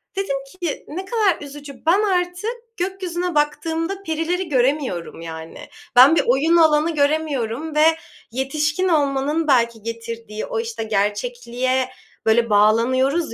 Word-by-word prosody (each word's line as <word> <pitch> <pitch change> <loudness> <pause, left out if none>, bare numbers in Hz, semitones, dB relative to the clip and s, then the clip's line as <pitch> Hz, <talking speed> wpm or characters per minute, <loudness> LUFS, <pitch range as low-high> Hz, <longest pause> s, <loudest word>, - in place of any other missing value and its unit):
dedim 385 -8 -1 0.2
ki, 335 -4 -3
"Ne 370 +6 -6
kadar 420 -7 +1
üzücü. 285 0 -10
Ben 365 +5 +4
artık 365 +3 -1 0.2
gökyüzüne 360 -2 -3
baktığımda 325 +5 -1
perileri 330 +2 -2
göremiyorum." 255 - 0
yani. 160 -1 -9 0.3
Ben 265 +6 +8
bir - - +3
oyun 285 +7 +3
alanı 315 0 +4
göremiyorum 290 -1 -1
ve 305 +1 +5 0.5
yetişkin 295 +7 -1
olmanın 295 0 +1
belki 235 -4 +2
getirdiği 230 -1 -6
o, - - -3
işte, 455 - -4
gerçekliğe, 240 +5 -1 0.4
böyle, 230 +1 +3
bağlanıyoruz 245 +8 +3
290 Hz, 120 wpm, -21 LUFS, 240-335 Hz, 0.5 s, Ben